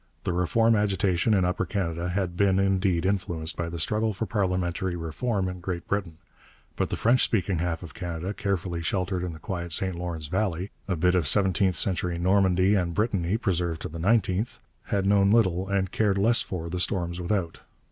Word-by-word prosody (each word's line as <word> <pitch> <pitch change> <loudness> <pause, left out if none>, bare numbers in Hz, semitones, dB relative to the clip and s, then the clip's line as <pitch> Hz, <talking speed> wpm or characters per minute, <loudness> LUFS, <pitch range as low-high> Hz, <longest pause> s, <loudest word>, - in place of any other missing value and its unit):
The 90 - -1
Reform 115 +6 +2
agitation 100 0 +1
in 95 -2 +2
Upper 90 +1 0
Canada 85 -2 -2
had 90 -1 -2
been, 95 0 +3
indeed, 95 -2 +1
influenced 85 -4 -1
by 85 -1 -3
the 85 - -5
struggle 105 +6 0
for 105 +4 -3
parliamentary 90 -3 -1
reform 95 +5 -2
in 90 0 -5
Great 90 -1 -5
Britain; 95 -6 -2 0.6
but - - -1
the - - -2
French 120 +3 +3
speaking 95 -5 0
half 85 0 -2
of 85 - -9
Canada, 90 +2 -4
carefully 95 -5 -2
sheltered 90 +1 -1
in 90 -2 -4
the - - -9
quiet 85 0 -5
St 95 +3 +3
Lawrence 85 -2 -5
valley, 95 +2 -2 0.2
a 95 - 0
bit 90 +2 +2
of 90 -6 +2
seventeenth 95 +2 +3
century 90 +2 +1
Normandy 95 +1 +3
and 90 -4 0
Brittany 105 -3 0
preserved 90 -7 -1
to - - -4
the 80 +1 -8
nineteenth, 100 +2 +1 0.3
had 100 -1 -1
known 100 0 +4
little 95 -4 +2
and 95 -2 0
cared 105 -3 +1
less 115 +5 +3
for 85 -3 -5
the 90 +2 -3
storms 90 -1 -1
without. 85 -2 -2
95 Hz, 190 wpm, -26 LUFS, 85-100 Hz, 0.6 s, known